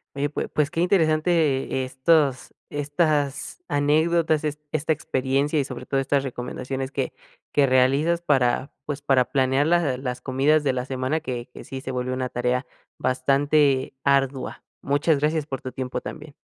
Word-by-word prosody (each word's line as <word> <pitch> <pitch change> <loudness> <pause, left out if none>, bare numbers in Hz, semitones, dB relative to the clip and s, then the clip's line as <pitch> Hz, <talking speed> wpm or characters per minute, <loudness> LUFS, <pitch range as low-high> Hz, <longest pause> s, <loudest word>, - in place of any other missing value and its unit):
Oye, 145 +1 0
pues 150 - -3
pues, 150 0 +1
qué 165 - -1
interesante 155 -6 +2
estos 135 0 +1 0.2
estas 145 - -1
anécdotas, 155 +2 +2
esta 150 +1 -2
experiencia 140 0 0
y 145 - +3
sobre 135 - -7
todo 135 - 0
estas 135 +1 +1
recomendaciones 130 +1 -4
que 135 -3 -2 0.4
que 145 - +5
realizas 135 +6 +3
para, 135 -3 +1
pues, 145 -1 -4
para 135 -3 +3
planear 135 +2 +1
las 160 -7 +2
las 125 -2 -4
comidas 140 +4 +2
de 135 -3 +1
la 125 0 -2
semana, 130 +4 -1
que 125 -5 -5
que - - -10
sí 135 -1 -7
se 130 - -5
vuelve 125 0 -2
una 130 0 -2
tarea 125 +2 -1 0.3
bastante 135 +1 +2
ardua, 135 -1 0 0.2
muchas 145 +1 +2
gracias 150 0 0
por 135 -4 -5
tu 130 - -6
tiempo 125 -1 -4
también. 150 -2 -8
140 Hz, 155 wpm, -24 LUFS, 130-150 Hz, 0.4 s, que